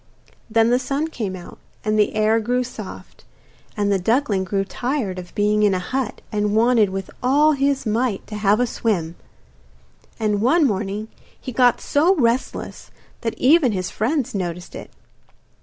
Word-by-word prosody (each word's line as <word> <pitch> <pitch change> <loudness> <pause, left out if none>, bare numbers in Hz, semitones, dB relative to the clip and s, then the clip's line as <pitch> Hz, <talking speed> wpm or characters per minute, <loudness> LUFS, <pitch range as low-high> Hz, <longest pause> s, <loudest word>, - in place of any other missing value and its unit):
Then 225 +1 +3
the 245 - +3
sun 285 +4 -2
came 210 -10 -4
out, 180 - -11 0.3
and 215 - +1
the 210 - +2
air 215 +1 +3
grew 245 +3 0
soft, 225 -5 -10 0.5
and 205 -1 +1
the 195 - +2
duckling 220 -1 +1
grew 195 +1 -1
tired 235 -3 -3
of 180 -1 -11
being 210 +1 +2
in 205 -2 +3
a - - +1
hut, 250 +5 -3
and 210 0 0
wanted 225 -2 +4
with 190 0 -5
all 285 +5 +4
his 275 -2 0
might 225 -1 -1
to 215 - -8
have 210 +1 +2
a 245 - +3
swim. 195 -9 -1 1.1
And 210 -2 0
one 310 +7 +4
morning 210 -1 -2 0.3
he 255 - -7
got 245 0 +3
so 330 +7 +3
restless 245 -4 -1 0.3
that 225 -2 -3
even 275 -3 +4
his 185 -2 -3
friends 265 +3 -1
noticed 180 -2 -4
it. - - -8
220 Hz, 165 wpm, -21 LUFS, 200-255 Hz, 1.1 s, wanted